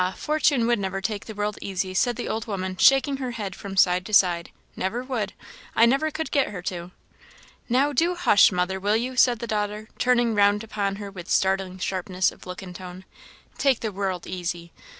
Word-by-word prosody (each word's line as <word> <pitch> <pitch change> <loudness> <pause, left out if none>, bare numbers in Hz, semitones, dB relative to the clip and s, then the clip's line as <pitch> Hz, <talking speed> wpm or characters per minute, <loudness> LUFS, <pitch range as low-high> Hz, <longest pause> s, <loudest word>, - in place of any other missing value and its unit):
Fortune 300 -5 +1
never 200 -5 0
would 195 - -6
take 215 -2 -3
the 220 - -8
world 205 0 -2
easy," 190 -1 -3
said 240 +5 +1
the - - -5
old 220 0 -3
woman, 185 -3 -3
shaking 270 +6 +4
her 260 -2 -4
head 205 -4 -5
from 195 -1 -8
side 180 -1 +4
to 215 - -9
side; 175 -3 +3 0.3
"never 225 +7 -2
would; 245 -6 -3 0.4
I 230 - +6
never 275 +6 +2
could 315 +1 -5
get 280 -2 +2
her 190 -4 -7
to." 175 -1 -4 0.8
"Now, 275 +4 +2
do 340 +4 +2
hush, 345 - +5
mother, 180 +1 -1
will 205 +3 +2
you!" 255 +3 -3
said 245 -1 +4
the 235 - -5
daughter, 210 0 -3
turning 240 -2 +3
round 205 0 +3
upon 200 -3 -2
her 200 -1 -7
with 180 -2 -10
startling 190 -1 +1
sharpness 185 0 -1
of - - -15
look 180 +1 -7
and 180 -1 -9
tone; 185 0 -9 0.3
" - - -27
'take 270 -4 +2
the 220 - -2
world 190 -2 -3
easy!' 175 -2 -5
205 Hz, 205 wpm, -25 LUFS, 185-240 Hz, 0.8 s, I